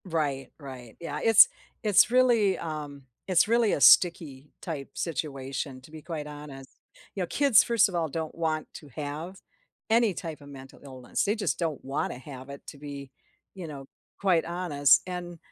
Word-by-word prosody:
Right, 145 -6 -2
right. 130 -5 -10
Yeah, 150 -3 -5
it's 225 -2 +8 0.4
it's 210 0 +5
really 235 -6 +3
um, 150 -3 -6 0.2
it's 185 +1 +3
really 230 -1 +3
a - - -1
sticky-type 150 -1 +3
situation, 135 -4 -4
to 135 - -17
be 160 -1 -10
quite 155 -2 -6
honest. 145 -2 -10 0.5
You 190 - -1
know, - - -4
kids, 275 -4 +4
first 230 -2 +3
of 190 - -7
all, 165 -2 0
don't 160 +2 -4
want 160 -2 -2
to 150 - -11
have 155 +5 -6 0.5
any 225 -2 +3
type 165 -3 -7
of 145 - -13
mental 135 -1 -12
illness, 130 -3 -4
they 205 +1 +1
just 215 - -2
don't 160 -5 -3
wanna 135 -2 -3
have 130 0 -10
it 140 0 -9
to - - -9
be, 140 -2 -9 0.4
you 180 -3 -7
know, 140 -3 -8 0.4
quite 180 -4 +2
honest 165 -5 +3
and 175 -1 -6
155 Hz, 170 wpm, -27 LUFS, 140-185 Hz, 0.5 s, it's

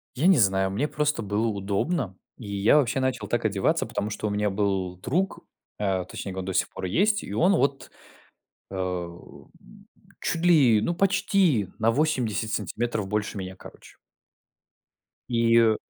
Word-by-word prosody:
Я 155 +8 +2
не 190 -6 +6
знаю, 95 -3 +3
мне 130 +10 -1
просто 150 -4 -1
было 105 +3 0
удобно, 100 - -2 0.2
и 115 - -10
я 105 +9 +4
вообще 135 -2 +2
начал 125 -5 -1
так 120 -1 -1
одеваться, 100 -2 +1
потому 105 +1 -3
что 105 - -3
у - - -1
меня 105 0 0
был 95 -3 -1
друг, 175 - -1 0.4
э, 95 -3 0
точнее, 95 -2 -7
он 95 - -3
до 95 - -3
сих 95 0 +1
пор - - -6
есть, 200 - +1
и - - -7
он 185 +4 +3
вот, 140 -1 0 0.8
эм, 90 -2 -6 0.7
чуть 165 - -1
ли, 135 -11 +5
ну, 170 - 0
почти 190 - +2
на 115 - +3
80 115 -6 0
сантиметров 110 +1 -2
больше 105 +1 -2
меня, 95 -1 -6
короче. - - -14 1.3
И 115 -2 +4
110 Hz, 155 wpm, -26 LUFS, 95-140 Hz, 1.3 s, не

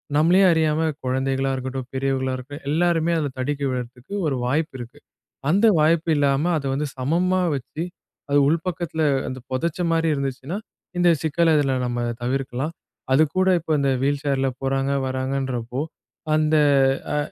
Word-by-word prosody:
நம்பளயே 170 +6 +5
அறியாம 160 -1 +2 0.2
குழந்தைகளா 135 +1 0
இருக்கட்டும், 130 0 -5
பெரியவங்களா 130 -1 -1
இருக்கட்டும் 145 +4 -9
எல்லோருமே 170 0 +2
அத 145 -2 -1
தடுக்கி 140 +2 -2
விடறதுக்கு 125 +5 -6
ஒரு 140 - 0
வாய்ப்பு 150 +3 -1
இருக்கு. 120 0 -9 0.5
அந்த 200 +7 +4
வாய்ப்பு 160 +2 +3
இல்லாம 145 +4 +2
அத 140 - -5
வந்து 145 +2 -1
சமமா 180 +8 +1
வச்சு, 135 +5 -5 0.5
அது 145 - +3
உள்பக்கத்துல 165 -1 -1 0.3
அந்த 130 - -6
புதைச்ச 155 +6 -1
மாதிரி 165 0 +2
இருந்துச்சுன்னா, 140 +5 -3 0.4
இந்த 175 -1 +4
சிக்கல்ல 160 +1 +3
இதுல 135 -2 +2
நம்ம 120 0 -2 0.2
தவிர்க்கலாம். 135 +4 -2 0.4
அது 150 +4 +6
கூட 185 0 +3
இப்ப 160 0 -5
இந்த 140 -1 +2
வீல்சேர்ல 140 -1 +1
போறாங்க, 135 0 0 0.2
வராங்கன்றப்போ, 130 -1 -2 0.5
அந்த 155 0 +2 0.6
அ - - +1
140 Hz, 140 wpm, -23 LUFS, 130-160 Hz, 0.6 s, அது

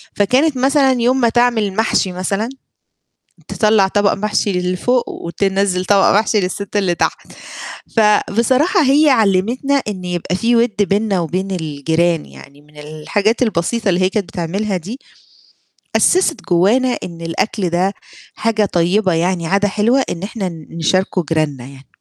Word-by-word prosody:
فكانت 260 +8 +2
مثلًا 270 +1 +3
يوم 255 +2 +2
ما 235 - +3
تعمل 230 -4 +1
محشي 220 -3 +1
مثلًا، 195 +5 -2 1.0
تطلّع 210 -3 +2
طبق 205 0 +1
محشي 210 0 -1
اللي 180 -1 -1
فوق 245 +5 0
وتنزّل 190 +1 -1
طبق 200 0 +3
محشي 220 -1 0
للسِت 200 +2 -4
اللي 185 -4 +1
تحت. - - -3 0.7
فبصراحة 235 - +2
هي 290 +3 +4
علّمِتنا 240 +5 +1
إن 185 -3 -5
يبقى 180 0 -3
في 235 +4 +1
وِد 230 -1 +1
بيننا 200 -1 +1
وبين 185 +4 -3
الجيران 160 0 -1
يعني، 140 +1 -15
من 150 0 -23
الحاجات 155 - -2
البسيطة 220 +1 0
اللي 180 -1 +1
هي 185 - +3
كانت 200 0 -2
بتعملها 190 +4 -3
دي، 210 - -8 1.0
أسست 365 -3 +2
جوّانا 225 +9 +2
إن 170 -1 -8
الأكل 180 +3 -2
ده 185 +4 0 0.4
حاجة 215 -2 0
طيبة 185 +2 +1
يعني 170 0 -1
عادة 200 +3 +1
حلوة، 225 +7 +1
إن 175 +2 -5
إحنا 200 -3 -4
ن 160 -3 -11
نشاركه 185 +2 0
جيراننا 150 -6 -1
يعني. 135 0 -14
195 Hz, 145 wpm, -17 LUFS, 175-230 Hz, 1.0 s, هي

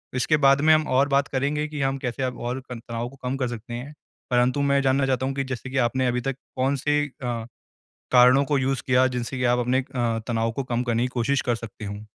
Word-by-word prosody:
इसके 140 +5 +2
बाद 140 -1 +4
में 155 +1 +6
हम 155 -1 +2
और 140 +2 +4
बात 140 0 +2
करेंगे 145 +3 -1
कि 150 -2 -5
हम 135 0 0
कैसे 130 0 -3
हम 125 -1 -2
और 120 +2 -3
तनाव 115 0 -5
को 135 - -15
कम 125 +2 -2
कर 130 - -1
सकते 120 0 -7
हैं। 130 +5 -6 0.4
परंतु 125 +3 +2
मैं 140 0 +3
जानना 135 0 +2
चाहता 130 -1 0
हूँ 135 - -1
कि 135 - -1
जैसे 130 -1 -5
कि 135 - -3
आपने 130 +1 +1
अभी 125 0 0
तक 135 +1 -2 0.2
कौन-से 140 +3 +1
अ, 120 -4 -5 0.7
कारणों 125 +2 +6
को 145 0 +1
यूज़ 135 0 0
किया 130 0 +4
जिनसे 125 0 -4
की 125 - -2
आप 120 0 +3
अपने 125 +2 +1
अ, 120 -3 -2
तनाव 115 -1 0
को 135 +4 -3
कम 125 -1 -1
करने 120 -1 0
की - - +1
कोशिश 130 +3 +1
कर 120 -1 0
सकते 115 -2 -9
हो? 105 +1 -7
130 Hz, 240 wpm, -24 LUFS, 120-135 Hz, 0.7 s, में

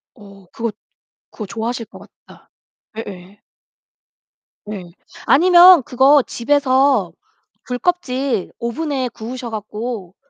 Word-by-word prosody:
어 200 -3 -16
그거 230 -1 -3 0.6
그거 215 - -7
좋아하실 230 +3 -4
것 - - -14 0.3
같다. - - -19 0.5
예예. 195 -2 -9 1.2
네. 205 -3 -7 0.4
아니면 355 0 +7
그거 265 +4 +4
집에서 265 -5 +1 0.6
귤껍질 255 - -2
오븐에 260 +1 -3
구우셔 240 +2 -7
가지고 215 -2 -6
240 Hz, 205 characters per minute, -18 LUFS, 210-275 Hz, 1.2 s, 아니면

